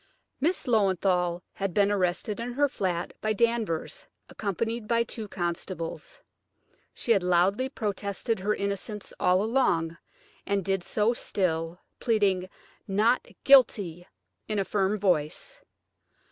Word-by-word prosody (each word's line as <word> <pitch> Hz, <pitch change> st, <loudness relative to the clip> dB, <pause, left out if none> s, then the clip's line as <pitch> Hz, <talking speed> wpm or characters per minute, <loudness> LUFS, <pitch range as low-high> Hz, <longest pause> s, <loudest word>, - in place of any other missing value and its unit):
Miss 340 Hz, +6 st, 0 dB
Löwenthal 185 Hz, -5 st, +2 dB
had 195 Hz, -3 st, -3 dB
been 205 Hz, 0 st, +4 dB
arrested 200 Hz, +2 st, 0 dB
in 240 Hz, +1 st, -4 dB
her 285 Hz, +3 st, +3 dB
flat 180 Hz, -10 st, -2 dB
by 215 Hz, 0 st, +1 dB
Danvers, 225 Hz, -7 st, -1 dB, 0.2 s
accompanied 225 Hz, +2 st, -3 dB
by 235 Hz, +1 st, +3 dB
two 225 Hz, -2 st, -6 dB
constables. 175 Hz, -, -5 dB, 0.7 s
She 235 Hz, -, -2 dB
had 200 Hz, -4 st, +5 dB
loudly 180 Hz, +8 st, +2 dB
protested 205 Hz, -1 st, -2 dB
her 210 Hz, +3 st, 0 dB
innocence 200 Hz, +1 st, -4 dB
all 180 Hz, +2 st, +3 dB
along, 175 Hz, -9 st, +1 dB, 0.5 s
and 200 Hz, -2 st, -1 dB
did 195 Hz, -2 st, 0 dB
so 215 Hz, +5 st, +1 dB
still, 170 Hz, -6 st, -2 dB, 0.2 s
pleading 200 Hz, -5 st, +1 dB, 0.4 s
"Not 215 Hz, +5 st, +2 dB, 0.2 s
guilty" 200 Hz, -10 st, +4 dB, 0.4 s
in 215 Hz, -, -2 dB
a 195 Hz, -, +1 dB
firm 195 Hz, +2 st, +1 dB
voice. 175 Hz, -7 st, -1 dB
200 Hz, 120 wpm, -27 LUFS, 180-225 Hz, 0.7 s, had